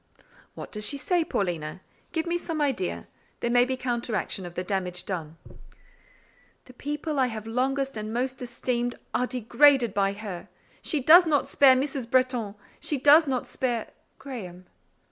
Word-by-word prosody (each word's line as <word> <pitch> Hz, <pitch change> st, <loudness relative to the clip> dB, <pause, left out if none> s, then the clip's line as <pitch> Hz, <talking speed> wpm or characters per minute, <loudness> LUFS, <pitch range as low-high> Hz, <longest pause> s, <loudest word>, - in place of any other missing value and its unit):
"What -, -, -8 dB
does 210 Hz, -1 st, -4 dB
she 280 Hz, +7 st, +2 dB
say, 350 Hz, +4 st, +1 dB
Paulina? 175 Hz, -, -3 dB, 0.3 s
Give 320 Hz, 0 st, -1 dB
me 345 Hz, 0 st, -1 dB
some 330 Hz, -2 st, -3 dB
idea. 265 Hz, -11 st, -1 dB, 0.3 s
There 235 Hz, -, -1 dB
may 245 Hz, 0 st, +5 dB
be 260 Hz, 0 st, -2 dB
counteraction 235 Hz, -6 st, -3 dB
of 175 Hz, -, -12 dB
the 180 Hz, -, -2 dB
damage 180 Hz, -2 st, -2 dB
done." 165 Hz, -4 st, -5 dB, 1.3 s
"The 255 Hz, -, -15 dB
people 295 Hz, +3 st, -3 dB
I 260 Hz, -, +3 dB
have 220 Hz, -2 st, -6 dB
longest 270 Hz, +3 st, -1 dB
and 215 Hz, 0 st, -5 dB
most 255 Hz, +3 st, -2 dB
esteemed 245 Hz, 0 st, -2 dB, 0.2 s
are 250 Hz, -, +1 dB
degraded 250 Hz, -1 st, +3 dB
by 195 Hz, -1 st, +1 dB
her. 200 Hz, -4 st, -7 dB, 0.3 s
She 300 Hz, -, -1 dB
does 340 Hz, +5 st, +8 dB
not 290 Hz, -3 st, +2 dB
spare 270 Hz, -2 st, +6 dB
Mrs. 265 Hz, -2 st, -2 dB
Bretton—she 255 Hz, 0 st, -1 dB
does 290 Hz, +4 st, +6 dB
not 255 Hz, -2 st, -1 dB
spare…. 245 Hz, -4 st, -2 dB, 0.3 s
Graham." 185 Hz, -10 st, -8 dB
250 Hz, 155 wpm, -26 LUFS, 205-275 Hz, 1.3 s, does